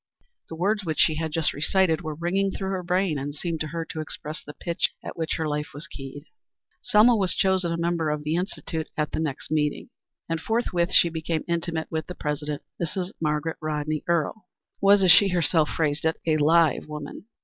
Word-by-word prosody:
The 160 - -6
words 205 +5 +1
which 160 -4 -2
she 155 -2 +4
had 160 -1 -2
just 160 -1 0
recited 160 +2 +2
were 155 -3 -4
ringing 185 +5 0
through 190 0 -3
her 190 -1 -1
brain 180 -3 +1
and 145 +2 -5
seemed 165 +1 -3
to 155 - -2
her 165 +1 -4
to 155 - -4
express 155 0 -6
the 150 - -10
pitch 170 -1 -1
at - - -6
which 160 -1 -1
her 160 -2 -1
life 150 +3 -3
was 150 +3 -7
keyed. 140 -1 -9 0.6
Selma 225 +3 +5
was 190 -4 +1
chosen 190 -3 +2
a 165 - -1
member 170 -1 0
of 150 0 -2
the 150 +1 -1
Institute 170 -3 -3
at 150 -1 0
the - - -2
next 155 -3 -3
meeting, 150 - 0 0.4
and 165 0 -2
forthwith 190 -6 0
she 170 - +6
became 160 -1 -2
intimate 170 -1 -2
with 160 -1 -2
the 180 - -6
president. 150 -1 -3 0.2
Mrs. 180 +3 -2
Margaret 150 +1 -1
Rodney 155 0 -2
Earle 170 +4 0 0.3
was, 200 0 +6
as 185 - +7
she 200 - +7
herself 165 -3 +2
phrased 155 -2 0
it, 160 0 +1
a 155 -2 +3
live 160 0 +3
woman. 150 +4 -7
160 Hz, 205 wpm, -25 LUFS, 150-180 Hz, 0.6 s, as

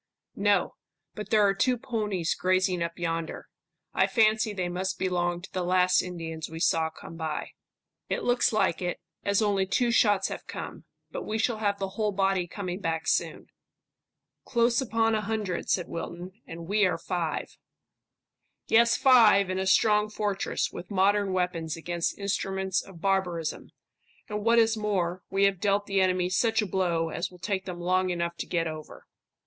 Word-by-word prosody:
"No, 200 -2 +2 0.4
but 210 - -7
there 215 -2 +4
are 195 - +3
two 250 +5 +1
ponies 210 -8 -1
grazing 185 -1 +1
up 170 0 -3
yonder. 165 -1 -3 0.5
I - - +3
fancy 220 -2 +3
they 185 -3 -2
must 185 +2 -3
belong 175 -1 -1
to 195 - -11
the 185 - -1
last 180 0 +3
Indians 165 -3 -6
we 160 0 -7
saw 160 -1 +2
come 165 +1 -11
by." 160 -2 -4 0.6
"It - - -1
looks 245 0 +2
like 215 -6 +1
it, 180 -1 -2 0.2
as 200 +2 +2
only 200 -2 +1
two 240 +5 +1
shots 205 -4 +3
have - - -7
come. - - -7 0.3
But - - -4
we 215 - -1
shall 225 +1 0
have 205 -2 0
the 195 -1 -3
whole 210 +2 -1
body 195 -2 +1
coming 185 0 -5
back 165 -4 -2
soon." - - 0 1.0
"Close 235 0 +2
upon 225 -2 +1
a 215 - +1
hundred," 210 -4 -3
said 180 - +1
Wilton, 175 +2 -6 0.2
"and 165 0 -8
we 210 +2 +2
are 180 - -1
five." 170 -1 -3 1.1
"Yes, 235 +1 +4
five, 215 -7 +6
in 185 - -1
a 190 - -1
strong 210 +1 +4
fortress, 205 -2 -2
with 175 - -8
modern 200 0 +2
weapons 180 -3 -1
against 170 +1 -2
instruments 190 -1 -1
of 180 -4 -14
barbarism; 180 -5 -1 0.6
and 210 -1 -4
what 230 +1 +4
is 225 -1 +4
more, 185 -4 -1
we 195 +1 +1
have 195 -2 +3
dealt 205 0 +1
the 195 -1 +1
enemy 185 -1 +2
such 220 +5 +1
a 215 - +2
blow 175 -4 0
as 170 +2 -3
will 180 - -15
take 190 +1 -3
them 180 -2 -6
long 185 +1 +1
enough 170 -1 -2
to - - -5
get 170 -2 0
over." 155 -1 -8
190 Hz, 175 wpm, -27 LUFS, 175-210 Hz, 1.1 s, five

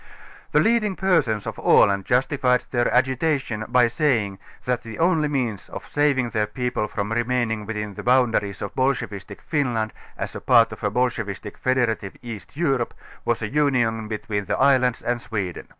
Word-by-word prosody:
The - - +4
leading 220 -3 +2
persons 160 - +1
of - - -5
Aland 100 -1 +4
justified 125 0 +2
their 120 -1 +1
agitation 130 -3 +1
by 125 0 +4
sajdng, 115 -6 0 0.3
that 125 -1 0
the 115 -1 -9
only 165 -3 +2
means 125 -9 -2
of - - -8
saving 140 -5 +1
their 105 -2 0
people 125 -1 -2
from 105 0 -4
remaining 115 -2 0
within 105 -2 -4
the - - -7
boundaries 115 -6 +2
of 100 - -4
a - - -3
bolsohevistic 125 -7 -2
Finland 120 -8 -1 0.2
as - - -5
a - - -6
part 115 -2 +5
of - - -10
a 105 - +2
bolschevistic 110 -3 -2
fede 130 0 0
rative 100 -3 -4
East 115 +2 -9
Europe, 135 -8 0 0.3
was 120 -1 0
a - - -1
union 120 -5 +1
between 105 -2 -3
the - - -1
islands 130 -3 +3
and 120 0 -1
Sweden. 95 -7 -4
120 Hz, 170 wpm, -23 LUFS, 110-130 Hz, 0.3 s, part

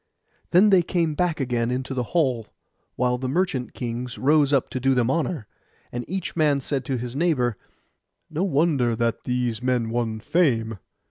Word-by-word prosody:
Then 195 +4 +5
they 190 -2 +6
came 170 -2 0
back 170 0 0
again 120 -3 0
into 130 +2 -2
the 130 - -1 0.2
hall, 125 -8 +1 0.5
while 125 0 +1
the 130 0 -3
merchant 145 -5 -1
kings 120 0 -4
rose 145 +1 +3
up 140 -3 +2
to 130 - -2
do 135 +1 +2
them 125 0 +2
honour. 160 -4 -1 0.5
And 120 0 -4
each 190 -1 -4
man 150 -4 +3
said 135 0 -2
to 130 0 -1
his 120 +1 -5
neighbour, 140 -8 +1 0.7
'No 165 +2 -2
wonder 145 -8 +2
that 115 0 -1
these 125 -2 -1
men 125 -3 0
won 115 -2 -1
fame. 115 - +1
130 Hz, 175 wpm, -24 LUFS, 120-155 Hz, 0.7 s, they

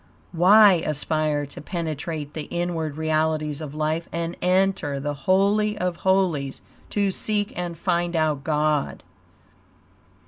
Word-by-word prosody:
Why 190 +1 +6
aspire 155 0 -1
to 140 - -9
penetrate 155 -2 -4
the 155 - -5
inward 165 -4 -3
realities 155 -1 0
of 150 -1 -7
life 155 +2 -1
and 170 +1 -3
enter 180 -6 +1
the 145 +1 -3
Holy 200 +8 +2
of 180 -1 -2
Holies 175 -9 0 0.3
to 200 -2 +1
seek 205 +1 -1
and 175 -1 -4
find 175 0 -1
out 155 -3 0
God? 150 -1 0
160 Hz, 125 wpm, -24 LUFS, 150-180 Hz, 0.3 s, Why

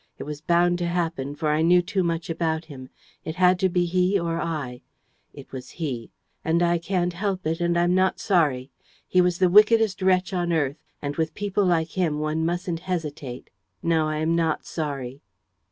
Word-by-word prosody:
It - - -6
was 150 0 -7
bound 175 +2 +2
to 175 - -1
happen, 165 -5 -2
for 155 0 -1
I 150 +1 +2
knew 175 +2 +5
too 190 +2 -1
much 170 -2 -1
about 160 -1 -1
him. 130 -4 -10 0.3
It 160 - -5
had 180 0 +4
to 190 - +2
be 175 0 +1
he 180 +3 +2
or 170 -1 -2
I.... 145 -7 -4 0.5
It - - -13
was 130 -1 -8
he... 130 -9 -4 0.3
and 170 +2 +2
I 170 0 +2
can't 175 0 -1
help 190 0 -2
it 165 +2 -1
and 170 0 +1
I'm 175 +1 +3
not 185 0 +2
sorry.... 145 -9 +1 0.4
He 185 - +4
was 180 -1 +1
the 185 - +4
wickedest 210 +1 +5
wretch 185 +1 +2
on 175 -1 0
earth; 145 -3 0 0.3
and, 145 0 -3
with 160 -1 -1
people 205 0 0
like 165 -2 +2
him, 165 -4 -1
one 155 +1 -1
mustn't 175 0 -2
hesitate. 150 -8 -5 0.3
No, 160 -2 +2
I 155 0 -2
am 160 +2 +1
not 165 -2 0
sorry." 140 -4 -4
170 Hz, 195 wpm, -24 LUFS, 155-180 Hz, 0.5 s, knew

